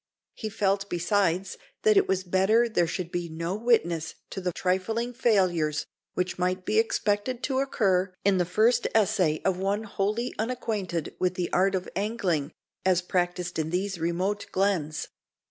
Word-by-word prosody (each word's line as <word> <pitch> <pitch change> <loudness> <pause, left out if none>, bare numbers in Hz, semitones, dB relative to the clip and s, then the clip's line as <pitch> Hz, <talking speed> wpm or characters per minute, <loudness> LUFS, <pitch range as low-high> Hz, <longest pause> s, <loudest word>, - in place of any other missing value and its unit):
He 220 - -5
felt, 200 -1 0
besides, 185 +1 0 0.2
that 435 -1 +5
it 395 -1 +4
was 190 0 0
better 195 +6 +3
there 175 -7 +1
should 175 +1 -4
be 175 -1 -3
no 165 +2 -3
witness 185 -8 +1 0.2
to 190 - -4
the 180 -1 -1
trifling 220 +8 -1
failures 180 - +2 0.3
which 180 0 -2
might 185 +1 0
be - - +3
expected 250 - 0
to 265 -2 0
occur 195 -8 +1
in 195 -2 +4
the 180 - +2
first 230 +7 +3
essay 195 -8 +2
of 185 -1 +1
one 200 +3 0
wholly 215 +3 -1
unacquainted 215 -8 -2
with 180 0 +1
the 180 -1 -3
art 190 +2 +3
of 185 - -3
angling, 185 -8 -1 0.3
as 185 -1 +3
practised 180 -1 -1
in 160 0 -1
these 185 +1 -2
remote 180 +5 -1
glens. 180 -6 0
190 Hz, 160 wpm, -27 LUFS, 175-215 Hz, 0.3 s, that